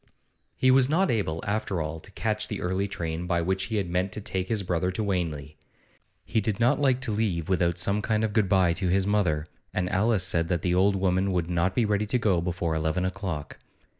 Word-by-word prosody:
He 130 - +4
was 130 0 +5
not 185 +5 +2
able, 85 -8 -1
after 100 -3 -1
all, 80 +1 -3
to 80 - -14
catch 110 0 -1
the 105 - -4
early 95 +3 -1
train 85 -2 -4
by 85 -1 +1
which 95 +2 0
he 110 - -4
had 100 -4 0
meant 90 +2 -1
to - - -4
take 95 -2 -3
his 105 -2 0
brother 90 0 0
to 95 +4 -2
Wanley. 80 -7 -3 0.7
He 110 - 0
did 105 0 -2
not 120 +1 +3
like 130 -2 +2
to 125 - -1
leave 100 -7 -1
without 85 -2 +1
some 100 +4 0
kind 110 +1 0
of 110 -2 -1
good 105 -4 +2
bye 90 -3 +4
to 95 +2 -2
his 95 +2 +2
mother, 90 -7 +1 0.3
and 90 -1 0
Alice 105 0 +2
said 85 -2 +1
that 85 -1 -1
the 90 - +1
old 95 +2 +3
woman 95 0 +1
would 90 -1 -1
not 90 +2 +1
be 120 - +2
ready 105 0 0
to 125 - +1
go 100 -7 +2
before 85 -1 -2
eleven 80 +3 0
o'clock. 95 -7 -4
95 Hz, 225 wpm, -26 LUFS, 85-105 Hz, 0.7 s, was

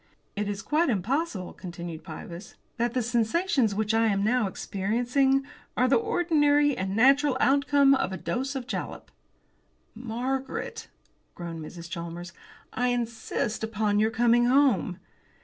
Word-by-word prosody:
"It 205 0 -2
is 200 -1 -4
quite 305 - +1
impossible," 230 - -1
continued 170 -3 -8
Pybus, 170 +2 -9 0.2
"that 235 +1 -1
the 250 - +1
sensations 240 - +1
which 215 +1 0
I 225 0 +3
am 200 -2 +1
now 235 0 +2
experiencing 245 +9 0 0.3
are 255 - +4
the 265 - +4
ordinary 295 - +2
and 190 +1 -3
natural 270 +3 +4
outcome 280 0 +4
of 265 -8 0
a 190 - -4
dose 265 +7 -3
of 260 -2 -4
jalap." 275 - -5 0.8
"Margaret," 250 +4 -4 0.5
groaned 165 -2 -6
Mrs. 170 +2 -9
Chalmers, 170 0 -6 0.4
"I 250 +1 0
insist 235 -2 -2
upon 210 -2 0
your 215 +1 +3
coming 240 +1 +3
home." 245 - +3
235 Hz, 135 wpm, -27 LUFS, 195-270 Hz, 0.8 s, are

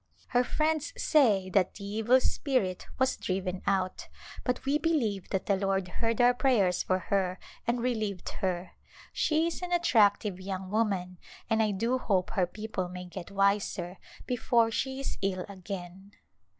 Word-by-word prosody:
Her 245 0 +3
friends 310 - 0
say 225 - +4
that 185 -1 +2
the 200 - -8
evil 225 +5 +3
spirit 255 -10 0
was 260 0 +2
driven 185 0 -2
out, 190 -2 0 0.4
but 250 0 -1
we 285 +2 +2
believe 230 - 0
that 190 - -1
the 200 - +3
Lord 195 -1 0
heard 225 +4 -2
our 245 0 +6
prayers 230 -9 +2
for 185 - +1
her 185 -1 0 0.3
and 235 0 +1
relieved 215 -7 -2
her. 180 -2 -1 0.4
She 315 +1 +2
is 335 +1 -3
an 360 0 -4
attract 225 - +4
ive 190 -3 -3
young 190 0 -5
woman 195 -5 0 0.3
and 225 0 +4
I 215 - +3
do 230 +6 0
hope 190 -7 0
her 190 -5 +1
people 210 -2 -4
may 180 0 -7
get 175 0 -8
wiser 200 -2 0 0.3
before 235 -2 +2
she 265 +3 -2
is - - -4
ill 185 -2 -1
again. 190 0 -8
200 Hz, 165 wpm, -29 LUFS, 185-245 Hz, 0.4 s, our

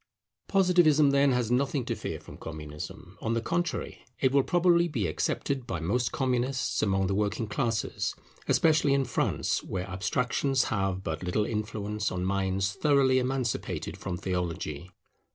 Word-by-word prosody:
Positivism, 175 -7 +4
then, 140 0 +4
has 120 -2 0
nothing 135 0 +1
to - - -1
fear - - -5
from - - -12
Communism; 75 -1 -8
on 115 +1 0
the - - +2
contrary, 170 +8 -2 0.2
it 130 - +3
will 140 0 +5
probably 175 +2 +3
be 130 -11 -1
accepted 125 - -1
by 95 -9 -2
most 120 +10 0
Communists 130 -1 0
among 95 -2 +2
the 95 - 0
working 105 +2 0
classes, 115 0 -1 0.3
especially 150 -3 +4
in 135 -1 +1
France 120 - 0
where 95 0 -4
abstractions 125 +7 0
have 95 -2 -1
but 80 -2 -3
little 90 +4 0
influence 105 -1 -2
on 90 0 -2
minds 95 0 0
thoroughly 135 -1 +3
emancipated 130 -2 -2
from 90 -2 -4
theology. 90 -3 -3
115 Hz, 150 wpm, -28 LUFS, 95-135 Hz, 0.3 s, will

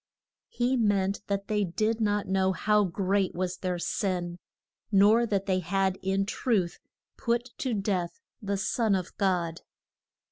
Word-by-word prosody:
He 250 +2 0
meant 200 -3 +1
that 200 0 -2
they 210 -1 +1
did 215 +5 -1
not 205 -1 +1
know 190 0 +2
how 210 +3 +2
great 195 +1 0
was 180 0 -2
their 180 -1 -2
sin; 175 -1 -2 0.5
nor 215 +4 +5
that 200 -2 0
they 185 -2 +1
had 190 +2 0
in 195 +1 0
truth 200 -4 0 0.4
put 240 +1 -1
to 255 -4 -1
death 190 -4 -1 0.2
the 200 -1 -1
son 215 +1 +1
of 185 -2 -4
God. 175 -4 0
195 Hz, 145 wpm, -28 LUFS, 185-210 Hz, 0.5 s, nor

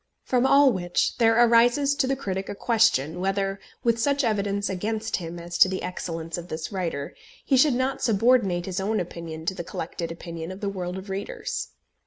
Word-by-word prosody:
From 255 0 +2
all 280 -1 +6
which, 175 -2 0
there 225 -1 +5
arises 240 +4 +5
to 285 -2 0
the 270 - +1
critic 195 -7 -4
a - - -4
question 205 - +2
whether, 195 +1 -1 0.2
with 235 -1 +2
such 280 +3 +1
evidence 200 -3 0
against 215 +4 -2
him 170 -1 -6
as 175 0 -6
to 185 - +7
the 185 - -3
excellence 165 -2 -4
of 175 - -9
this 160 +3 -5
writer, 165 -7 -3 0.3
he 275 - +3
should 260 0 +5
not 260 +2 -1
subordinate 215 -5 +3
his 190 0 -3
own 215 +3 0
opinion 165 -2 -6
to 190 - 0
the 180 -2 -5
collected 165 0 -5
opinion 165 0 -7
of 185 - -8
the 200 - -2
world 180 -2 -4
of 190 +1 -8
readers. 195 +1 -4
195 Hz, 195 wpm, -25 LUFS, 175-230 Hz, 0.3 s, to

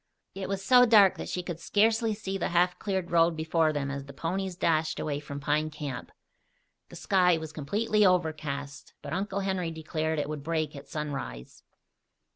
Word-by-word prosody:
It 190 -1 -5
was 195 -1 -3
so 250 +2 +7
dark 205 -4 +6
that - - -5
she 180 - -3
could 175 -2 -5
scarcely 220 +4 +2
see 195 -2 -5
the 190 - -1
half 180 +1 +2
cleared 190 -4 -2
road 165 -1 +3
before 160 0 +2
them 140 -2 -2
as 140 -1 -5
the 140 - -11
ponies 185 +5 -3
dashed 160 -2 +1
away 145 -2 -2
from 140 -1 -7
Pine 150 +2 0
Camp. 150 -3 -6 0.8
The - - -11
sky 180 -3 +3
was 160 -1 -7
completely 210 +9 +1
overcast, 155 -6 -1
but - - -5
Uncle 195 +1 -2
Henry 190 -3 -1
declared 160 0 -3
it 145 -1 -1
would 150 -1 -5
break 155 0 -2
at 140 - -10
sunrise. 140 - -6
165 Hz, 180 wpm, -28 LUFS, 150-190 Hz, 0.8 s, so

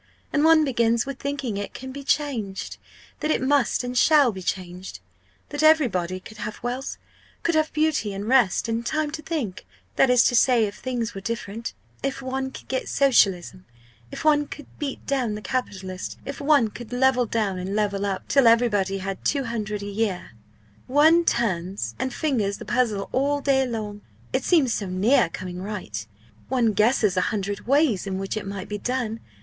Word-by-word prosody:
And 295 - +3
one 320 -1 +6
begins 235 -3 +2
with 275 -1 -6
thinking 275 -7 -3
it 205 - -5
can 260 0 -7
be 280 +1 -7
changed 250 -10 -2 0.4
that 305 - -2
it - - +2
must 265 -2 +2
and 245 0 -4
shall 285 -1 +5
be 190 -2 -8
changed! 180 - -5 0.5
that 290 - -3
everybody 225 - +3
could 215 +3 -13
have 210 0 -5
wealth 250 +2 -3 0.5
could 335 - +1
have 310 -1 +2
beauty 305 -9 +1
and 200 +2 -5
rest, 240 -5 +3
and 230 +1 -1
time 305 +4 -1
to 310 0 -5
think, 285 - -4 0.3
that 270 - +5
is 250 -1 +6
to 245 - +2
say 240 -2 +5
if 200 - -4
things 240 -3 -3
were 195 - -7
different 230 +1 -5 0.3
if 275 0 -2
one 265 0 -3
could - - -11
get 260 0 -2
Socialism 195 -9 +2 0.5
if - - -7
one 295 -1 +4
could 295 0 -9
beat 285 -3 -4
down 255 -6 0
the - - -5
capitalist 190 -6 -4
if 280 +1 -6
one 280 -6 +4
could 240 +1 -10
level 250 -1 +3
down, 210 -4 -1
and 190 +2 -3
level 200 -2 0
up, 195 -2 -3
till 275 -4 +4
everybody 210 -5 +3
had 195 0 -5
200 225 -7 -1
l. - - -5
a - - -5
year. 200 -3 -2 0.6
One 315 +6 +5
turns 185 - -1
and 260 - -1
fingers 235 -9 -1
the - - -9
puzzle 215 -2 0
all 285 +2 +1
day 270 -2 +2
long. 210 -3 -5 0.3
It - - +1
seems 290 -9 +3
so 205 - -2
near 185 +2 +3
coming 180 +1 -6
right 175 - -5 0.4
one 240 -4 +2
guesses 215 -1 +3
a - - +4
hundred 205 -1 -3
ways 275 - +2
in 190 -1 -2
which 195 +2 -3
it 215 -2 -4
might 195 -1 -5
be 210 0 -4
done! 245 -2 -2
235 Hz, 185 wpm, -24 LUFS, 200-270 Hz, 0.6 s, one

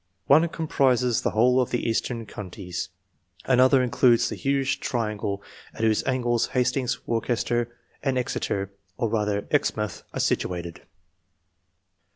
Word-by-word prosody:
One 160 +4 +5
comprises 130 -7 +1
the - - +1
whole 125 +4 +3
of 125 - -1
the 120 - -1
Eastern 115 +1 -1
Counties, 95 -2 -6 0.6
another 130 +1 +5
includes 120 -1 +3
the - - -4
huge 135 0 0
triangle 105 -4 -2 0.3
at - - -6
whose 110 -1 +2
angles 120 -3 +1
Hastings, 125 0 0
Worcester, 120 0 -1 0.2
and 135 -2 0
Exeter, 100 -5 -2 0.3
or 115 -3 0
rather 105 -2 0
Exmouth, 105 -1 0
are - - -5
situated. 85 -3 -1
120 Hz, 125 wpm, -25 LUFS, 105-130 Hz, 0.6 s, One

